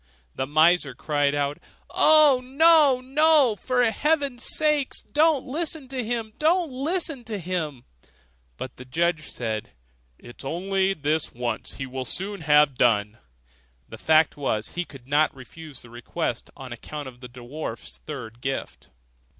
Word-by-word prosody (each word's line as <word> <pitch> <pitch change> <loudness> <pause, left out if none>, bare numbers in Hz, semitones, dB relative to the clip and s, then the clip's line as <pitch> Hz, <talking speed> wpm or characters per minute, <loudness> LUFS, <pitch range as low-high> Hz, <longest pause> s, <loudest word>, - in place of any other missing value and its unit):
The 130 - -3
miser 155 -1 +3
cried 145 -2 0
out, 145 0 -1 0.3
'Oh, 300 -4 +5
no! 285 0 +5
no! 285 -2 +4
for 250 +3 0
heaven's 280 -1 0
sake 300 -3 +2 0.2
don't 305 -2 +3
listen 305 0 -3
to 260 -2 -3
him! 225 -1 -3
don't 330 0 +2
listen 295 0 -1
to 215 -2 -4
him!' 165 -8 -4 0.7
But 130 - -7
the 125 - -10
judge 160 +3 0
said, 110 - -4 0.4
'It 120 - -14
is - - -7
only 190 +6 0
this 150 0 -1
once, 120 0 -3
he 135 - -5
will 130 0 -5
soon 195 +5 -4
have 150 -2 +4
done.' 110 -2 +2 0.7
The - - -10
fact 160 -1 +3
was, 110 -7 -2
he 175 0 -4
could 135 -5 -14
not 145 +2 +2
refuse 145 +2 -11
the 120 - -15
request, 120 -1 -4
on - - -8
account 150 -2 -7
of 125 -2 -11
the 125 -1 -10
dwarf's 120 +1 -8
third 120 -6 -7
gift. 135 +1 -5
160 Hz, 150 wpm, -25 LUFS, -, 0.7 s, Oh